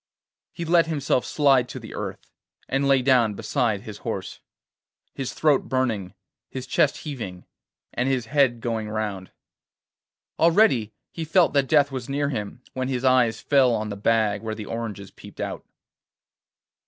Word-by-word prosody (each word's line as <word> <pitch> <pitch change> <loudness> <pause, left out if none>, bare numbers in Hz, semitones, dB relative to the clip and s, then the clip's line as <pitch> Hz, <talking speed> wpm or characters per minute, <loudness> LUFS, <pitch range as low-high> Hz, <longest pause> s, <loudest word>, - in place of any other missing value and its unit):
He 170 - -6
let 165 0 +4
himself 140 -5 0
slide 135 -4 +3
to - - -6
the - - -10
earth, - - -6 0.4
and 135 +1 0
lay 135 -2 +4
down 120 -5 +3
beside 115 -4 -1
his 105 -1 -9
horse, - - -5 0.7
his 135 -2 -5
throat 150 -3 +2
burning, 115 -8 -1 0.3
his 130 -1 -6
chest 140 +2 +2
heaving, 105 -12 -6 0.5
and 125 +2 0
his 130 -3 0
head 130 -2 +2
going 110 -2 -2
round. 105 -3 -3 1.1
Already 165 - +4 0.2
he 165 - -5
felt 170 +1 +3
that 140 -2 +2
death 145 -2 +4
was 130 -1 -5
near 140 +1 0
him, 115 -1 -5
when 130 0 -2
his 130 -1 -2
eyes 125 -3 +3
fell 130 -4 +4
on 105 0 -3
the 100 - -4
bag 105 -1 +1
where 110 -1 -4
the 105 -1 -7
oranges 105 -3 -5
peeped - - -14
out. - - -4
125 Hz, 155 wpm, -24 LUFS, 110-140 Hz, 1.1 s, let